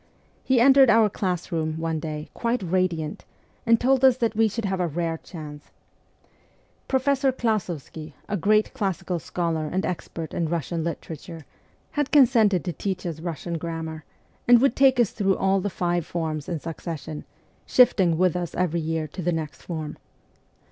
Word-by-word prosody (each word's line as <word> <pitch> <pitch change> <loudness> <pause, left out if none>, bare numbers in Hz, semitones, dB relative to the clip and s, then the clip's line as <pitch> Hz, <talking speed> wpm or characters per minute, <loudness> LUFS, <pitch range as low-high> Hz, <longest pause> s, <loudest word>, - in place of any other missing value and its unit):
He 260 -2 +3
entered 270 +1 +7
our 220 -2 +5
class 180 -3 -2
room, 160 -1 -1
one 165 -1 -2
day, 150 -1 -5
quite 235 -2 -1
radiant, 170 -3 -1 0.4
and 230 0 +5
told 265 +1 +2
us 260 -2 +6
that 230 -3 0
we 225 +1 +4
should 220 +1 -4
have 190 -1 -1
a 180 - +1
rare 165 +1 -2
chance. 150 -3 -10 1.2
Professor 270 0 +2
Klas6vsky, 180 - -3
a 205 - -2
great 215 +3 +2
classical 185 -3 -2
scholar 165 -1 -2
and 185 +5 -1
expert 165 -2 -5
in 170 - -1
Bussian 165 0 -2
literature, 165 -1 -6 0.5
had 290 -2 -1
consented 230 - +4
to 175 - -2
teach 185 -1 -4
us 165 -3 -4
Bussian 170 0 -4
grammar, 160 -1 -5 0.4
and 240 -1 +8
would 265 -1 +3
take 265 -2 +4
us 235 -4 +3
through 195 -3 +1
all 195 0 +2
the 205 - -1
five 175 -1 -1
forms 155 -3 -4
THE - - -3
CORPS 160 - -5
OF 165 -1 -4
PAGES - - -13
99 165 - -1
in - - -6
succession, 150 +1 -8 0.4
shifting 190 -9 +4
with 180 -1 +2
us 175 -2 -3
every 170 -2 0
year 160 0 -2
to 180 +5 -7
the 175 +1 0
next 160 -3 -4
form. 160 -3 -5
175 Hz, 180 wpm, -25 LUFS, 160-220 Hz, 1.2 s, and